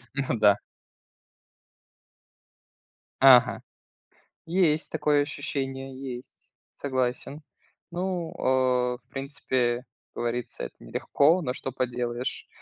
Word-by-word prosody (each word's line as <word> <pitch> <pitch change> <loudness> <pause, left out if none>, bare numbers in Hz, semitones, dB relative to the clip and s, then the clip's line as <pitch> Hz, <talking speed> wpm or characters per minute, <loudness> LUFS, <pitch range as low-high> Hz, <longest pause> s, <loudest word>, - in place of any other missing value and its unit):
Ну 130 -4 -1
да. 105 -1 +6 2.6
Ага. 130 -2 +7 0.9
Есть 165 -3 +2
такое 150 -2 +2
ощущение, 135 -2 -4 0.2
есть. 125 +1 -16 0.2
Согласен. 130 +2 -2 0.5
Ну, 175 -1 -2
э, 125 -1 +2
в - - -38
принципе, 135 -1 -4
э, 120 0 +2 0.3
как - - -4
говорится, 120 +1 -3
это - - -8
нелегко, 150 - +2
но 125 - -1
что 135 +1 -5
поделаешь. 125 -1 -2
130 Hz, 95 wpm, -27 LUFS, 125-145 Hz, 2.6 s, Ага